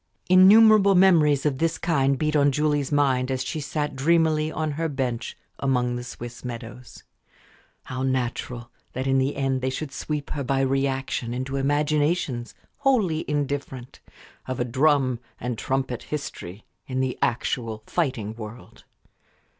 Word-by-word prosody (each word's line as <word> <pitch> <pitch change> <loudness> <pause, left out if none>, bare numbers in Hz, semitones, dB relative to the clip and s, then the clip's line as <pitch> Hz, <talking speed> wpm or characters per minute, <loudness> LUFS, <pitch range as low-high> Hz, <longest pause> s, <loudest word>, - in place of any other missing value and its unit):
Innumerable 200 +2 +7
memories 160 -7 +4
of 135 -3 0
this 165 0 0
kind 140 -5 +1
beat 155 +1 0
on 145 -1 +4
Julie's 145 -1 0
mind 135 -3 +2
as 130 -1 -1
she 155 - -3
sat 150 0 -3
dreamily 155 +1 +2
on 155 -1 -2
her 160 +3 -2
bench 130 -5 -3 0.2
among 125 -3 0
the 120 - -5
Swiss 120 -1 -9
meadows. 120 0 -8 0.8
How 130 0 -5
natural 125 -2 -2 0.2
that 130 +1 -3
in 135 0 +2
the 135 +2 0
end 135 -1 -1
they 130 - 0
should 140 +2 -5
sweep 150 +1 -4
her 145 - -3
by 135 +1 0
reaction 135 -2 -1
into 130 +2 -3
imaginations 145 -2 0 0.2
wholly 215 - +1
indifferent 140 -3 -3 0.5
of 130 -1 -4
a 120 - +1
drum 130 -1 +2 0.2
and 125 0 -3
trumpet 130 +1 -2
history, 110 -9 -7 0.2
in 130 -1 -2
the 130 -1 -1
actual 115 -2 -1
fighting 130 -11 -2
world. 110 +1 -11
135 Hz, 145 wpm, -24 LUFS, 125-150 Hz, 0.8 s, Innumerable